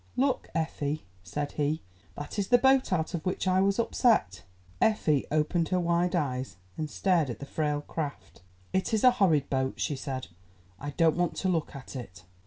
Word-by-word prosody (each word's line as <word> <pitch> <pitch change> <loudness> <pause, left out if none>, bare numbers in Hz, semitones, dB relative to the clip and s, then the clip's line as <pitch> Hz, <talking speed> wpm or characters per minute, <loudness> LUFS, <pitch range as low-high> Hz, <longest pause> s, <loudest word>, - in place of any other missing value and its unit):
"Look, 265 0 +1
Effie," 155 -3 -2 0.2
said 145 +11 -4
he, 150 +2 -1 0.3
"that 145 +8 -5
is 195 - 0
the 245 - +6
boat 265 -1 +4
out 165 -1 0
of 170 - -3
which 185 +1 -2
I 185 0 +4
was 195 0 +2
upset." 230 - +2 0.4
Effie 155 -10 +2
opened 155 +2 +1
her 185 - +2
wide 175 +1 +1
eyes, 130 - -2 0.2
and 155 -1 -3
stared 170 -4 +1
at 120 - -4
the 140 - -7
frail 150 0 -1
craft. 145 - -6 0.3
"It 190 +4 +1
is 215 - 0
a 255 - +8
horrid 155 -7 +4
boat," 130 -1 -1
she 150 - 0
said; 130 -1 -5 0.5
"I 145 - -5
don't 165 +2 +2
want 175 -1 0
to 190 - -1
look 165 -4 -1
at 140 +1 -9
it." 95 -8 -8
160 Hz, 190 wpm, -29 LUFS, 145-185 Hz, 0.5 s, a